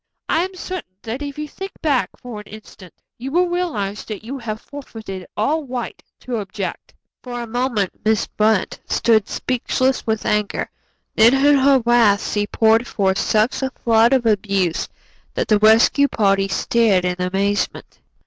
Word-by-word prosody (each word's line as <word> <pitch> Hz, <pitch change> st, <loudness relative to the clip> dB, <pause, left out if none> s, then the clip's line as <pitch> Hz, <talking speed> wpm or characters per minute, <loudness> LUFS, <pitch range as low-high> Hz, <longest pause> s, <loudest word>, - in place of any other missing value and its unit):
I 325 Hz, -, +2 dB
am 375 Hz, +1 st, -6 dB
certain 365 Hz, -, -7 dB
that 235 Hz, +5 st, -5 dB
if 285 Hz, -1 st, -6 dB
you 300 Hz, 0 st, -4 dB
think 385 Hz, +6 st, -8 dB
back 285 Hz, -5 st, +1 dB
for 240 Hz, -4 st, -8 dB
an 210 Hz, -, -12 dB
instant 210 Hz, -4 st, -13 dB, 0.3 s
you 260 Hz, +3 st, -5 dB
will 355 Hz, +3 st, +3 dB
realize 300 Hz, -, -2 dB
that 215 Hz, -2 st, -7 dB
you 265 Hz, +5 st, -6 dB
have 215 Hz, -3 st, -5 dB
forfeited 220 Hz, -10 st, -9 dB
all 300 Hz, +9 st, +1 dB
right 245 Hz, -2 st, -5 dB, 0.2 s
to 245 Hz, -2 st, -3 dB
object." 195 Hz, -2 st, -6 dB, 0.3 s
For 245 Hz, -1 st, -6 dB
a 240 Hz, -, -4 dB
moment 235 Hz, -4 st, -2 dB
Miss 220 Hz, -1 st, +2 dB
Brant 215 Hz, -2 st, 0 dB
stood 220 Hz, -3 st, +2 dB
speechless 255 Hz, +1 st, -1 dB
with 220 Hz, -1 st, -1 dB
anger, 210 Hz, -1 st, -1 dB, 0.4 s
then 230 Hz, +4 st, +6 dB
in 285 Hz, +2 st, +5 dB
her 265 Hz, -2 st, +4 dB
wrath 235 Hz, -4 st, +3 dB
she 205 Hz, 0 st, 0 dB
poured 225 Hz, +2 st, +3 dB
forth 190 Hz, -1 st, 0 dB
such 215 Hz, +5 st, +1 dB
a 265 Hz, -, 0 dB
flood 230 Hz, -2 st, +3 dB
of 260 Hz, -3 st, +2 dB
abuse 200 Hz, -5 st, 0 dB, 0.5 s
that -, -, -1 dB
the 210 Hz, -1 st, +3 dB
rescue 225 Hz, +6 st, +5 dB
party 195 Hz, -5 st, +1 dB
stared 195 Hz, -1 st, +2 dB
in 180 Hz, 0 st, -1 dB
amazement. 195 Hz, +3 st, -2 dB
225 Hz, 165 wpm, -20 LUFS, 205-260 Hz, 0.5 s, then